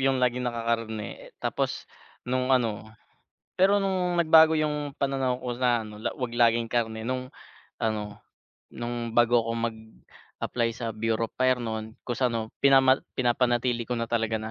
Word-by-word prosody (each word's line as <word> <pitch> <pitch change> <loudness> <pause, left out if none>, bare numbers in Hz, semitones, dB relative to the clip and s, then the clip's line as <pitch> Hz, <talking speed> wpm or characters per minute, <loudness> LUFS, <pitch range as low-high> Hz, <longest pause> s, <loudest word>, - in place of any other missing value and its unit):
yung 135 0 +2
laging 125 -1 +1
naka-karne, 115 -2 -3
eh, - - -21
tapos - - -2 0.4
nung 130 +1 -1
ano, 115 -5 +1 0.7
pero 195 +2 +4
nung 185 -3 0
nagbago 160 -1 +6
yung 150 -1 -1
pananaw 135 -2 0
ko 125 -1 -4
sa 120 -3 +1
ano 105 0 -11
wag 125 0 -3
laging 115 -1 +3
karne 115 -1 -2
nung 130 0 -3 0.5
ano 105 -2 -2 0.5
nung 120 -1 -4
bago 120 0 +5
ako 115 - -1 0.2
mag-apply 110 +1 -6
sa 115 -1 -4
Bureau 115 +1 -1
of - - -58
Fire 130 -1 +2
nu'n 110 -1 -5
tas 125 +1 0
ano 115 -2 -2
pinaman 135 -1 +5 0.2
pinapanatili 120 -1 +1
ko 125 - -2
na 115 -1 -3
talaga 115 -1 0
na 110 - -5
120 Hz, 155 wpm, -27 LUFS, 115-130 Hz, 0.7 s, nagbago